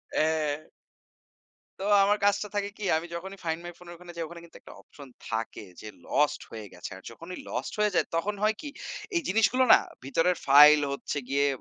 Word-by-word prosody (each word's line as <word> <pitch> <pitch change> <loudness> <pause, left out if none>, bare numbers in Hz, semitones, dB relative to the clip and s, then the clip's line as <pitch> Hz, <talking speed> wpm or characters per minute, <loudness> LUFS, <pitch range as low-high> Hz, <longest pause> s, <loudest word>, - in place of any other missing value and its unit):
অ্যা 155 -1 0 1.2
তো - - -3 0.2
আমার 205 +1 +2
কাজটা 205 +1 +2
থাকে 200 0 -1
কি? 210 - -6
আমি 165 +2 -3
যখনই 190 +3 -7
ফাইন্ড 160 0 -2
মাই 175 - -6
ফোন 180 - -15
এর - - -9
ওখানে 175 0 -12
যাই, 165 - -3
ওখানে 170 +1 -11
কিন্তু 170 - -15
একটা - - -14
অপশন 140 -2 -14 0.2
থাকে 110 -1 -4 0.2
যে, 105 - -8 0.2
লস্ট 150 0 +1
হয়ে 110 -2 -8
গেছে। 90 - -8
আর 95 - -13
যখনই 165 +9 -9
লস্ট - - -4
হয়ে 210 -2 +2
যায়, - - +2
তখন 205 +5 -1
হয় 215 0 +3
কি? 300 - -6 0.5
এই 340 - +2
জিনিসগুলো 225 +6 +3
না? - - +7 0.3
ভিতরের 165 +6 +1
ফাইল 150 +2 +9
হচ্ছে 140 +1 -4
গিয়ে 140 +1 +2
170 Hz, 195 wpm, -28 LUFS, 145-200 Hz, 1.2 s, ফাইল